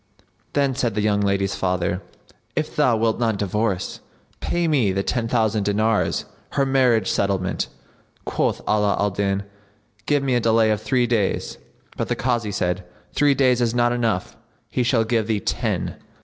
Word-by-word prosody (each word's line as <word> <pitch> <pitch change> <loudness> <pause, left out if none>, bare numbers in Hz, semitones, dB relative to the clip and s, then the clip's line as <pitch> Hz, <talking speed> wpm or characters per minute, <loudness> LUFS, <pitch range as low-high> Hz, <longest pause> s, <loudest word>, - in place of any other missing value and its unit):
Then 140 -2 +2
said 120 -4 -1
the 105 - +1
young 105 -1 +2
lady's 100 -1 +1
father, 90 -1 -1 0.5
"If - - -2
thou 120 -3 +3
wilt 110 0 +1
not 115 -3 +1
divorce, 100 -1 -1 0.4
pay 175 -1 0
me 130 -11 +2
the 95 +1 -1
ten 120 0 -1
thousand 110 -3 +1
dinars, 110 +2 +1 0.3
her 140 - +2
marriage 125 -6 +3
settlement." 95 -2 0 0.6
Quoth - - 0
Ala 105 -1 +2
al 100 0 +1
Din, 100 +1 -1 0.6
"Give 145 -2 +2
me 135 -2 +1
a 120 - +3
delay 115 -1 +3
of 105 - 0
three 120 +3 +1
days;" 110 -5 -1 0.4
but - - -1
the - - 0
Kazi, 120 -4 -1
said, 90 0 -1 0.3
"Three 145 -1 +3
days 125 -2 +3
is 120 0 +1
not 120 0 +3
time 120 - -1
enough; 110 -6 -1 0.4
he - - 0
shall 120 -1 +2
give 110 -1 0
thee 110 -2 +1
ten." - - -2
110 Hz, 170 wpm, -22 LUFS, 100-120 Hz, 0.6 s, thou